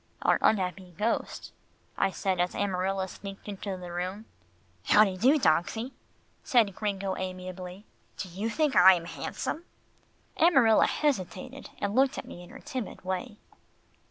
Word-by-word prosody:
"Our - - +3
unhappy 185 -3 0
ghost," 220 +3 -2 0.4
I 195 - +2
said 190 -1 -2
as 180 0 0
Amarilla 190 -1 -1
sneaked 195 +1 -10
into 200 -1 -5
the 180 -1 -8
room. 185 +5 -4 0.6
"How 210 - +7
de 195 -3 0
do, 260 +11 +4
dogsie," 220 - +1 0.5
said 235 -8 +3
Gringo 195 -2 -2
amiably. 185 +1 -6 0.3
"Do 190 - -4
you 195 +6 -3
think 300 +4 +1
I 190 +1 +9
am 170 -1 -5
handsome?" 305 - -4 0.7
Amarilla 265 -10 +5
hesitated, 190 - -2
and 200 0 -2
looked 265 +3 +3
at - - -5
me 175 - -10
in 175 - -13
her - - -11
timid 245 -7 -6
way. 190 +4 -3
195 Hz, 145 wpm, -28 LUFS, 185-220 Hz, 0.7 s, I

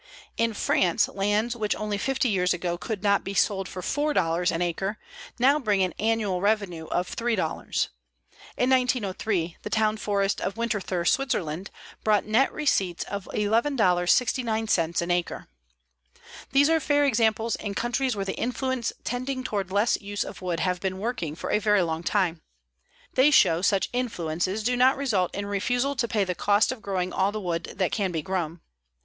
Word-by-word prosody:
In 230 -1 0
France 185 0 +2
lands 205 +4 0
which 215 -3 -1
only 210 -1 -3
fifty 270 +3 0
years 180 -5 +2
ago 175 0 -2
could 200 +2 -5
not 200 -1 +3
be 195 - -5
sold 195 +1 +1
for 185 - -7
$4 180 - +1
an 165 - -1
acre 190 +5 -2 0.4
now 270 +4 +4
bring 205 -7 +2
an 180 -3 -1
annual 215 -4 0
revenue 200 -6 0
of 180 +1 -2
$3. 235 - -3 1.3
In 250 - +2
1903 215 -8 0
the - - -6
town 220 -1 +1
forest 200 -2 0
of 195 - -2
Winterthur, 210 -6 -2
Switzerland, 195 - 0 0.3
brought 210 -2 +3
net 225 +6 +3
receipts 195 - 0
of 200 -1 -6
$11.69 220 - +1
an 175 - -2
acre. 175 -1 -2 1.0
These 280 +2 +5
are 325 - +4
fair 290 -1 +2
examples 225 -3 +2
in 200 -1 -5
countries 245 +2 0
where 195 -1 -3
the 190 - -2
influence 250 0 -1
tending 255 +2 -3
toward 200 -6 -2
less 205 +5 +1
use 205 0 -3
of - - -9
wood 175 -2 -2
have 180 -1 0
been 190 -1 -2
working 200 -8 -3
for - - -5
a - - +3
very 210 -2 +3
long 160 -1 -2
time. 175 -2 0 0.7
They 265 +3 +5
show 170 - +5
such 200 0 +2
influences 190 -4 -2
do 245 +3 +1
not 255 +2 +4
result 215 -10 0
in 200 +1 -3
refusal 245 +7 0
to 235 - +1
pay 215 -2 +1
the 185 -1 -2
cost 205 +5 +2
of 260 -4 -7
growing 185 -3 -2
all 195 +1 +1
the 215 - -4
wood 175 -4 -2
that 185 -3 +1
can 195 -4 0
be 160 -3 -3
grown. 175 -3 -3
205 Hz, 170 wpm, -26 LUFS, 180-235 Hz, 1.3 s, These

